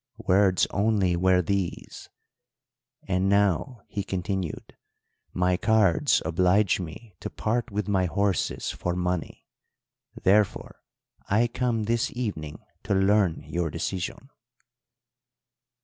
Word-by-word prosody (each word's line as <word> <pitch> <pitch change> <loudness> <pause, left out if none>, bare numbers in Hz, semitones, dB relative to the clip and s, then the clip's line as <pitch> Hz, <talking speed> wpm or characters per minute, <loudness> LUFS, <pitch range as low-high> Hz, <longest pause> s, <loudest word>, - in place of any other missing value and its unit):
"Words 95 0 +4
only 100 -3 +1
were 90 +1 +3
these. 95 -1 -3 1.0
'And 95 0 +1
now,' 100 - +1
he 100 - -4
continued 95 -2 -4 0.6
'my 90 0 +1
cards 110 - +3
oblige 90 +5 +2
me 95 +5 -8
to - - -5
part 120 +3 -2
with 105 0 -3
my 95 -3 +2
horses 100 +1 -1
for 90 0 -3
money; 90 -2 -3 0.8
therefore 100 +1 +1 0.5
I 110 +4 +3
come 120 -2 -1
this 115 +2 0
evening 80 -11 -4 0.2
to 100 - -1
learn 95 -3 +2
your 85 -1 -2
decision.' 90 - -4
95 Hz, 105 wpm, -26 LUFS, 90-105 Hz, 1.0 s, Words